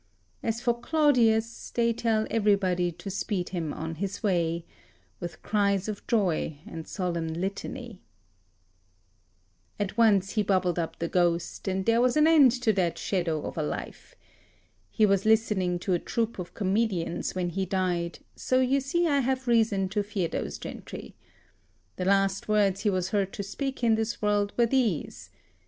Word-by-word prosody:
As 225 0 -1
for 240 -2 +2
Claudius, 235 -6 +2
they 235 -1 +1
tell 220 -1 +1
everybody 195 -5 +2
to 195 +4 -7
speed 190 -2 -2
him 165 -5 -3
on 160 +2 -5
his 195 +6 -4
way 170 -4 0 0.5
With 170 -2 -7
cries 200 -2 +1
of 210 -2 -6
joy 180 -8 0
and 160 -1 -8
solemn 175 -4 -2
litany. 195 +6 -5 1.8
At 205 +2 -2
once 200 -4 +4
he 215 - +1
bubbled 185 -3 +1
up 165 - -3
the 170 - -2
ghost, 175 0 0
and 190 0 -1
there 230 +1 +3
was 250 +3 +2
an 305 - +5
end 305 -6 +7
to 220 -3 +4
that 180 -4 0
shadow 170 -5 -1
of - - -5
a - - +1
life. 150 - -6 0.7
He 215 - +3
was 195 -1 +2
listening 210 -5 +2
to 185 +1 -1
a 175 - +2
troupe 230 +1 -2
of 175 - -7
comedians 195 -5 -1
when 180 -1 -1
he 190 +2 -2
died, 175 -2 -1 0.2
so 255 - +1
you 260 +2 +3
see 310 +6 0
I 285 -4 +3
have 260 0 -1
reason 220 -5 +3
to 205 +2 0
fear 200 -4 -2
those - - -4
gentry. - - -8 0.8
The 180 - -2
last 195 0 +2
words 205 -2 +2
he 210 - +2
was 185 -1 -1
heard 195 -1 0
to 200 - -4
speak 265 +6 -4
in 230 -1 +4
this 220 +1 -1
world 205 -1 +1
were 240 - +5
these. 230 - -1
200 Hz, 165 wpm, -27 LUFS, 180-230 Hz, 1.8 s, end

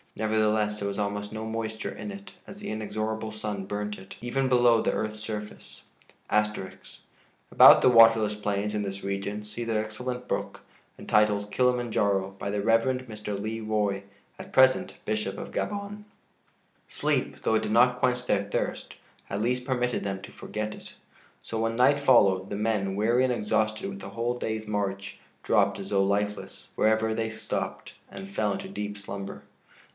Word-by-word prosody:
Nevertheless, 110 -1 +1
there 100 - -2
was 100 - -4
almost 105 0 -2
no 110 0 -5
moisture 110 0 -4
in 210 - -6
it, 200 0 -10 0.2
as 195 - -10
the 210 - -6
inexorable 110 +1 -3
sun 105 -2 -4
burnt 105 +1 -4
it, 95 0 -12
even 130 +3 -1
below 120 -2 +5
the - - +1
earth's 110 0 -3
surface.* 105 -1 -7 0.5
[*About 105 -2 +3
the - - +5
waterless 115 -3 +6
plains 105 0 -2
in 105 - -1
this 100 -1 -5
region 100 +2 -3
see 105 +3 -6
the 115 -1 -1
excellent 125 +4 -4
book, - - -3 0.4
entitled 105 -1 +2
"Kilima 125 0 +2
Njaro," 95 -2 0
by - - -3
the 100 0 -1
Rev. 115 +4 +2
Mr. 105 -2 -5
Le 110 +2 -4
Roy, 105 -2 0 0.4
at - - -9
present 130 0 +4
Bishop 105 -2 -2
of - - -7
Gabon.] 205 0 -4 0.9
Sleep, - - -1
though 110 - +2
it 110 - +1
did - - -2
not 125 +2 +4
quench 125 0 +1
their 100 -4 +1
thirst, 100 - -3 0.3
at 100 +1 -2
least 125 +2 0
permitted 125 -2 0
them 95 -1 -3
to - - -9
forget 105 +1 -5
it; - - -12 0.5
so 115 - -4
when 115 0 0
night 130 +4 +4
followed, 95 -8 +4
the - - -3
men, 105 -2 0
weary 115 +5 +2
and 130 - +2
exhausted 110 - 0
with 195 0 -6
the - - -8
whole 120 +1 -2
day's 110 -2 -3
march, 100 -1 -3 0.2
dropped - - +2
as 95 - -7
though 100 -1 +3
lifeless, 105 +1 -2
wherever 110 0 +2
they 110 0 -1
stopped, 110 0 -4 0.2
and 195 - -8
fell 195 - -1
into 195 0 -5
deep 105 - -5
slumber. 100 -1 -7
110 Hz, 170 wpm, -27 LUFS, 105-120 Hz, 0.9 s, waterless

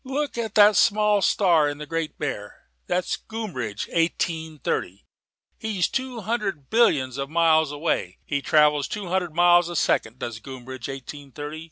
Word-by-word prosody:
"Look 280 +2 -3
at 225 -3 -4
that 210 0 +7
small 210 0 +3
star 170 -7 +3
in 145 - -5
the 150 - -7
Great 165 +1 -3
Bear: 105 -8 -5 0.2
that's 180 0 -1
Groombridge 130 - -5
Eighteen 165 -1 -1
thirty. 100 -8 -3 0.5
He's 210 -5 0
two 260 -3 -4
hundred 200 - -3
billions 140 - +3
of 135 0 -3
miles 160 -2 +3
away. 145 - -2
He 140 -2 -2
travels 150 -1 +3
two 200 -4 -5
hundred 180 -3 -1
miles 175 0 +5
a 175 - -6
second, 115 -6 +1
does 115 -3 -5
Groombridge 130 0 -8
Eighteen 135 +1 -9
thirty. 150 +3 -7
160 Hz, 160 wpm, -24 LUFS, 140-200 Hz, 0.5 s, that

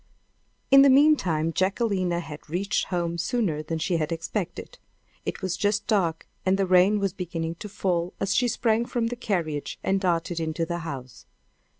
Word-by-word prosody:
In 275 0 +9
the 280 - +7
meantime 225 - +4
Jacquelina 185 -3 0
had 155 -2 -10
reached 195 +5 0
home 170 -2 -2
sooner 170 -5 0
than 160 +1 -3
she 170 +2 0
had 155 -1 -2
expected. 180 - -4 0.5
It - - -4
was 185 -2 -1
just 205 0 0
dark, 170 -7 0 0.2
and 190 +1 +2
the 195 - +2
rain 185 +3 +5
was 195 -3 -1
beginning 165 -2 -4
to 210 - -7
fall 180 -3 -1
as 195 0 0
she 245 - +3
sprang 230 0 +1
from 230 -2 -1
the 245 - -4
carriage 170 - -2
and 195 0 +1
darted 170 -2 0
into 160 +1 -1
the 170 +1 -3
house. 135 -7 -8
180 Hz, 175 wpm, -26 LUFS, 165-205 Hz, 0.5 s, In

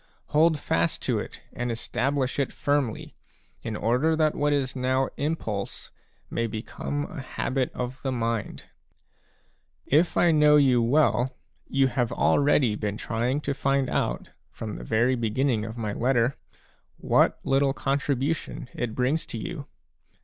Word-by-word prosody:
Hold 155 0 +4
fast 85 -10 0
to - - +1
it - - -8
and 120 -1 -2
establish 130 +4 -1
it 140 - 0
firmly, 145 -6 -1 0.5
in 110 - -4
order 125 +10 +2
that 155 -1 +2
what 145 0 +1
is 135 -2 0
now 130 +1 +1
impulse 115 -10 -3 0.4
may 115 - -1
become 120 +6 -4
a 170 -6 -7
habit 130 0 -2
of 125 +1 -4
the 135 - -2
mind. 115 -3 -2 1.2
If 160 +5 +2
I 175 - +5
know 150 -1 +6
you 130 -5 +5
well, 130 0 +2 0.3
you 135 0 +2
have 125 -2 0
already 140 -5 +3
been 105 -1 -3
trying 120 +7 -1
to 140 - -1
find 135 -1 0
out, - - -1 0.2
from - - -6
the - - -8
very 120 - +2
beginning 115 0 0
of 110 +1 -7
my 110 -3 -2
letter, 125 +2 +1 0.6
what - - +2
little 135 0 +2
contribution 140 +1 -2
it 120 -3 -3
brings 130 +6 0
to - - -5
you. 110 - -6
130 Hz, 145 wpm, -26 LUFS, 115-145 Hz, 1.2 s, know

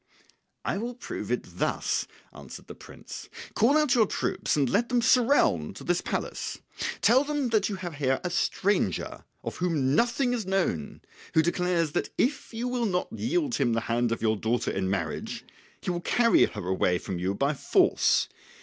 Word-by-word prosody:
"I - - -1
will 240 +2 -4
prove 245 - -6
it - - 0 0.2
thus," - - 0 0.3
answered - - -11
the - - -9
prince. - - -11 0.2
"Call 260 +7 +4
out 300 -4 +3
your 225 -4 +4
troops - - -1
and 140 -2 +3
let 235 - +1
them 245 -1 +2
surround 230 - +3
this 175 - -1
palace; - - -3 0.4
tell 255 +4 +5
them 290 -3 -1
that 220 -3 +2
you 200 - -3
have 175 -3 -6
here 135 -2 +1
a 180 - -2
stranger, 185 - 0 0.2
of - - -5
whom 150 -7 +1
nothing 245 - +2
is 225 -6 -3
known, 180 - -1 0.3
who 160 - +5
declares 170 -1 +1
that - - -1
if 275 +4 0
you 230 +2 -3
will 245 -2 0
not 180 -2 -1
yield 285 +1 -1
him 120 - +1
the 115 - 0
hand 120 +1 0
of 115 - -2
your 110 -1 +3
daughter 115 +3 0
in 95 -1 -1
marriage 100 -2 -3 0.4
he - - -2
will 175 -1 -3
carry 230 +6 +4
her 90 - -6
away 90 -1 +2
from 90 0 -5
you 95 +2 -1
by 140 +7 +1
force. 140 - +3
180 Hz, 180 wpm, -27 LUFS, -, 0.4 s, tell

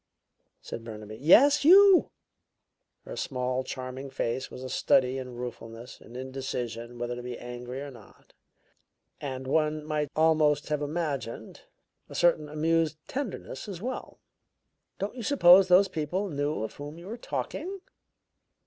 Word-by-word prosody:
said 115 - -7
Burnaby. 110 -1 -8
"Yes, 275 - +6
you!" 385 +3 +7 1.0
Her - - -7
small, 125 0 -2
charming 130 +1 -6
face 130 0 -2
was 130 - -9
a - - -4
study 130 +1 +2
in 125 -2 -7
ruefulness, 120 0 -8
and 120 - -11
indecision 125 -3 -5
whether 120 0 -3
to 125 - -6
be 125 0 -6
angry 125 +2 -7
or 145 0 -7
not, 125 - -17 0.9
and, 130 -2 -5
one 155 +2 0
might 150 -2 -1
almost 155 -2 +3
have 150 -1 0
imagined, 145 -5 -4 0.5
a - - -10
certain 160 -3 +2
amused 160 +1 +1
tenderness 235 - -5
as 190 -4 -6
well. 255 +6 -6 0.8
"Don't 200 - -3
you 250 - -7
suppose 190 -7 +6
those 185 +2 +6
people 185 +4 -2
knew 145 -3 -1
of 110 - -5
whom 145 +2 -8
you 170 - -11
were 215 +4 -5
talking?" 375 +9 -5
145 Hz, 140 wpm, -28 LUFS, 125-175 Hz, 1.0 s, you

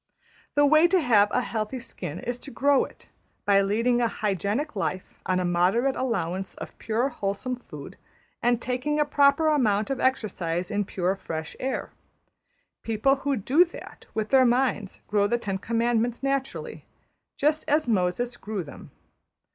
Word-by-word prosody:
The 290 0 +5
way 310 +3 +6
to 370 +1 +3
have 215 -9 +4
a - - +1
healthy 220 +3 -3
skin 240 - -7
is 245 0 -4
to 280 - -9
grow 280 0 +3
it, - - -17 0.4
by 200 -1 +5
leading 230 +5 +1
a 235 - +3
hygienic 210 - -2
life 190 -1 -4
on 185 0 +2
a 180 - 0
moderate 185 +10 +2
allowance 190 -7 -2
of - - -9
pure 230 +4 0
wholesome 200 +1 -3
food, 250 - -11 0.4
and 240 -1 +2
taking 255 +5 -1
a 300 - +3
proper 290 +2 +3
amount 220 -7 +2
of 270 - -2
exercise 185 -8 -1
in 205 -1 0
pure 185 0 -1
fresh 160 -5 -6
air. 265 +1 -3 0.9
People 230 +5 +1
who 280 +1 -1
do 265 - +4
that 345 - -11
with 220 -1 -1
their 265 -1 +6
minds 240 -5 +1
grow 205 -1 +2
the 240 - +1
Ten 195 -5 -3
Commandments 235 +2 0
naturally, 275 -1 -2 0.5
just 300 +2 +1
as 300 -1 +2
Moses 225 +4 0
grew 205 -3 -4
them. 145 - -12
235 Hz, 160 wpm, -26 LUFS, 200-270 Hz, 0.9 s, way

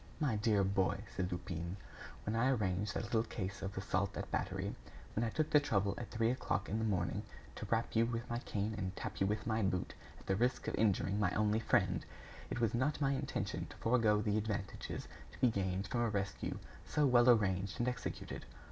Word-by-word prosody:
"My 145 -8 +2
dear 105 -2 +3
boy," 95 +1 +1
said 95 -1 -1
Lupin, 85 0 -4 0.5
"When 105 - 0
I 120 +4 +3
arranged 105 -4 0
that - - -1
little 110 - +2
case 100 -4 -4
of 95 0 -4
assault 95 0 0
and - - -5
battery, - - -1 0.4
when 110 - +1
I 115 - +1
took 155 +6 0
the 150 - +8
trouble 100 -8 +1
at 120 - -6
three 115 0 +2
o'clock 115 -5 -1
in 110 - -1
the 110 - 0
morning, 95 -1 0 0.3
to - - -6
rap 115 0 0
you 115 +1 +4
with 115 0 -3
my 120 0 -2
cane 105 -2 -2
and 95 -1 -3
tap - - -5
you 95 - +4
with 105 +1 -1
my 110 0 +1
boot 95 -2 0 0.3
at - - -16
the 95 - +1
risk 125 +5 +1
of - - -1
injuring 100 -1 +2
my 105 -3 +3
only 105 +1 +3
friend, 115 - +2 0.5
it - - -2
was 115 -3 +2
not 130 +6 +1
my 140 -2 +2
intention 135 - -2
to - - -12
forego 115 -3 +3
the 105 0 +2
advantages 105 -3 -4 0.3
to - - -13
be 125 - +5
gained 95 -1 -1
from 120 +4 -1
a 120 - +2
rescue 100 -2 -2 0.3
so 145 - +2
well 125 -2 +6
arranged 100 -4 +3
and 120 - +1
executed. 125 0 -4
105 Hz, 210 wpm, -36 LUFS, 95-115 Hz, 0.5 s, the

